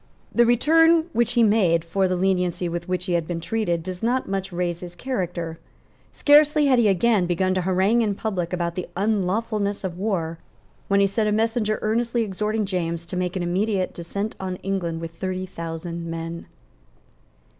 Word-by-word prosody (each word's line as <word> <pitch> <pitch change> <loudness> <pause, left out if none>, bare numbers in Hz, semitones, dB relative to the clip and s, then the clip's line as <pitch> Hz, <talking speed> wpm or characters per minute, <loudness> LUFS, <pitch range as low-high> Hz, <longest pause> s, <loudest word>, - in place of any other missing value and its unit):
The 235 0 +4
return 325 +7 +4
which 235 0 +1
he 240 -1 +4
made 185 -7 +3
for 190 +3 +1
the 185 - 0
lenity 180 -1 0
with 170 +1 -4
which 180 0 -1
he 180 - -1
had 170 -2 0
been 175 -2 -3
treated 175 -3 -1
does 180 0 -6
not 245 +3 0
much 195 0 -3
raise 175 -1 -2
his 175 -1 -9
character. 175 -9 -3 0.5
Scarcely 300 0 +5
had 260 -3 +4
he 225 - +4
again 200 -1 +3
begun 185 +2 +1
to 185 - 0
harangue 190 +6 +2
in 210 -3 0
public 190 -5 -3
about 170 -2 -1
the 180 0 -4
unlawfulness 205 +1 0
of 180 -2 -4
war, 170 -6 -2 0.5
when 200 0 +3
he - - +5
sent 210 +2 0
a - - 0
message 225 +1 +1
earnestly 230 +2 +1
exhorting 210 +1 -1
James 170 -3 -2
to 180 - -6
make 180 0 -2
an 185 - -1
immediate 190 +2 0
descent 200 +5 -4
on 185 -1 -3
England 175 -4 -2
with 165 0 -5
thirty 185 +2 -4
thousand 170 -1 -6
men. 165 0 -5
190 Hz, 180 wpm, -23 LUFS, 175-220 Hz, 0.5 s, Scarcely